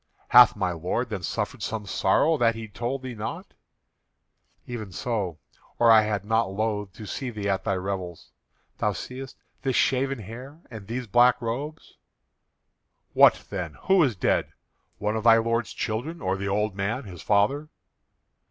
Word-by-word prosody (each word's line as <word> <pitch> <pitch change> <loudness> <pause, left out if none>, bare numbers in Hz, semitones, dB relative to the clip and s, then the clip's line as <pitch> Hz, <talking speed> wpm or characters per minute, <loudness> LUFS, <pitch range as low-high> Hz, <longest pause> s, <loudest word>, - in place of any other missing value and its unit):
"Hath 125 0 +8
thy 95 -3 -1
lord 90 +9 -2
then 105 -4 -4
suffered - - -3
some 110 -2 -3
sorrow 100 +11 +2
that 115 -5 +2
he 115 -1 -7
told 120 +5 -4
thee 130 -1 -5
not?" 110 -2 -6 1.1
"Even 110 -5 -6
so, 95 -4 -3 0.4
or 115 -1 +5
I 110 -1 +8
had 105 -2 -2
not 110 -1 +1
loathed 105 -1 -2
to 110 - -9
see 130 +5 -4
thee 105 -4 -4
at 95 -1 0
thy 100 -3 +1
revels. 90 -2 -5 0.5
Thou - - +1
seest 130 +1 -8 0.2
this 130 -1 -1
shaven 135 +1 +2
hair 125 - -10
and 110 -4 -9
these 125 +2 -4
black 120 +3 +4
robes." 140 +7 -5 1.2
"What - - +5
then? 90 -6 -4
Who 190 -1 +4
is 130 -8 +2
dead? 90 - 0 0.4
One 105 +1 -1
of 110 - -2
thy 115 -1 +8
lord's 115 +1 0
children, 125 +10 -3
or 95 +1 -1
the 100 0 -4
old 105 0 0
man, 105 +7 -2
his 90 -6 -10
father?" 120 +9 +1
110 Hz, 160 wpm, -26 LUFS, 100-125 Hz, 1.2 s, Hath